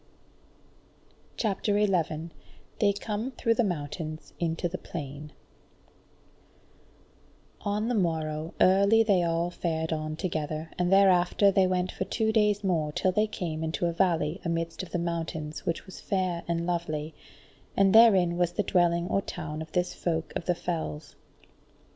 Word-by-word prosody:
CHAPTER 205 -1 0
11 170 -5 0 0.5
They 205 -2 +4
Come 210 +4 -3
Through 230 - +1
the 240 - +2
Mountains 155 -3 -4
Into 165 0 -1
the 185 +2 -5
Plain 145 -1 -7 2.3
On 210 +1 -1
the 245 - 0
morrow 160 -5 -1
early 200 +4 +5
they 200 -5 +3
all 170 +1 0
fared 160 -2 -2
on 155 0 -3
together, 155 -2 -3
and 180 0 +1
thereafter 195 0 +5
they 190 -1 +3
went 185 0 0
for 190 - -3
two 220 +1 0
days 210 -2 +2
more 165 -6 0
till 185 +5 +1
they 210 +3 +2
came 160 -6 -4
into 160 +2 -1
a 170 - 0
valley 170 -1 +1
amidst 165 0 -2
of 185 - -8
the - - -2
mountains 165 -3 -4
which 165 - -2
was 190 - -11
fair 185 -3 -1
and 170 0 -1
lovely, 160 -3 -2 0.6
and 195 -1 +4
therein 195 -7 +6
was 175 -1 +1
the 210 - 0
dwelling 175 -2 +2
or 195 - +1
town 155 -5 -6
of 160 0 -8
this 180 0 0
Folk 165 -2 -2
of 170 - -3
the 180 - +1
Fells. 160 - -4
175 Hz, 150 wpm, -28 LUFS, 160-195 Hz, 2.3 s, therein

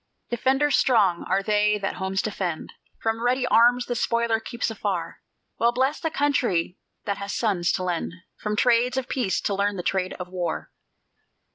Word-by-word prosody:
Defenders 265 +5 +2
strong 205 -9 +3
are 195 +1 +1
they 210 0 +2
that 195 -1 -3
homes 190 0 -1
defend; 185 -6 -3 0.3
From 225 0 0
ready 250 +2 +1
arms 245 +1 +4
the 245 - -2
spoiler 235 -1 +1
keeps 235 +1 -3
afar. 190 -6 -3 0.4
Well 235 +1 +4
blest 265 +5 0
the 320 - 0
country 255 - 0 0.3
that 200 -2 -2
has 200 0 -4
sons 190 -6 +1
to 185 - -1
lend 175 -2 -2 0.2
From 210 0 -3
trades 245 +2 +3
of 260 -2 -1
peace 240 -8 0
to 205 - -1
learn 200 +1 0
the 180 - -4
trade 185 0 -1
of 180 - -7
war. 180 -3 -4
215 Hz, 170 wpm, -25 LUFS, 190-245 Hz, 0.4 s, arms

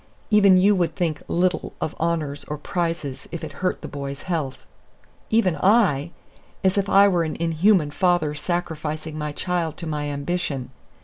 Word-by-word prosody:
Even 200 -3 +6
you 200 +3 +5
would 170 -4 0
think 160 -4 -1
little 180 +1 0
of 155 - -2
honors 155 -4 -1
or 150 - -4
prizes 165 -5 -3
if 170 -1 -6
it 155 - -5
hurt 185 - 0
the - - -6
boy's 140 -1 -6
health." 155 -7 -2 0.7
Even 210 -7 +3
I! 180 - +3 0.5
as 190 0 +3
if 200 -1 0
I 200 +1 +7
were 175 -4 +2
an 160 - -3
inhuman 165 0 +2
father 175 -3 +2
sacrificing 155 -1 -3
my 150 -1 -3
child 170 0 -2
to 170 - -6
my 150 -2 -2
ambition. 140 -3 -3
165 Hz, 165 wpm, -23 LUFS, 150-185 Hz, 0.7 s, I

